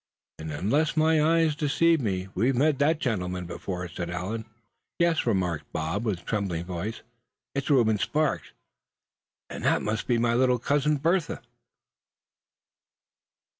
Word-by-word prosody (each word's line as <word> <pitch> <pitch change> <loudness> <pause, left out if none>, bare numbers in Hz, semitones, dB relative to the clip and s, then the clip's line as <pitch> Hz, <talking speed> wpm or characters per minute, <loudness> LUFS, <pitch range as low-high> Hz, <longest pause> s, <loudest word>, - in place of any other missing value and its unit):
"And 80 0 -5
unless 140 - 0
my 155 0 +4
eyes 165 -1 +3
deceive 165 +1 +2
me, 95 -5 -2
we've 125 +7 +1
met 145 +2 +2
that 155 +3 +3
gentleman 90 - -2
before," 90 +1 -5
said 85 0 -5
Allan. 95 +6 -4 0.5
"Yes," 170 -5 +2
remarked 90 -8 -1
Bob, 80 +8 -2
with 95 -6 -2
trembling 95 -6 -2
voice, 95 +5 -5 0.5
"it's 140 +1 -3
Reuben 115 -7 +4
Sparks; 150 +6 0 1.0
and - - -7
that - - +2
must 105 0 -2
be 120 - +2
my 115 0 +2
little 125 +1 +3
cousin, 145 +4 +1
Bertha!" 165 +3 0
115 Hz, 130 wpm, -27 LUFS, 90-150 Hz, 1.0 s, my